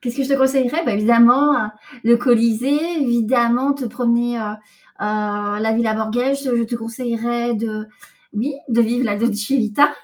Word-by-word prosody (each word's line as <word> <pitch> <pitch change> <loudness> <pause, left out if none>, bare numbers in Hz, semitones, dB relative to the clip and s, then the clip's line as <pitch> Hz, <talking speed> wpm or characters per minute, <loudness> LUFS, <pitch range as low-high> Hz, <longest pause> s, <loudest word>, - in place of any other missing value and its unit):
Qu'est-ce 245 -1 -5
que 275 - 0
je - - -6
te 275 - +3
conseillerais? 265 +4 +1
Bah, 240 - 0
évidemment, 235 +7 +5
heu, - - -5 0.4
le 235 +1 +5
Colisée, 250 +7 +1
évidemment, 240 +2 +2
te 280 -2 -6
promener, 240 0 -1
heu - - -4
heu, 210 0 -5 0.4
à 205 -1 -2
la 220 0 0
Villa 220 -1 0
Borghese. 245 +6 -1
Je 235 - +1
te 235 +1 -5
conseillerais 235 +1 -3
de 215 -1 -4 0.5
oui, 245 +7 -3
de 235 -1 +2
vivre 240 +3 0
la 205 -4 -1
Dolce 210 -1 -1
Vita. 270 +3 +3
235 Hz, 175 wpm, -19 LUFS, 220-260 Hz, 0.5 s, évidemment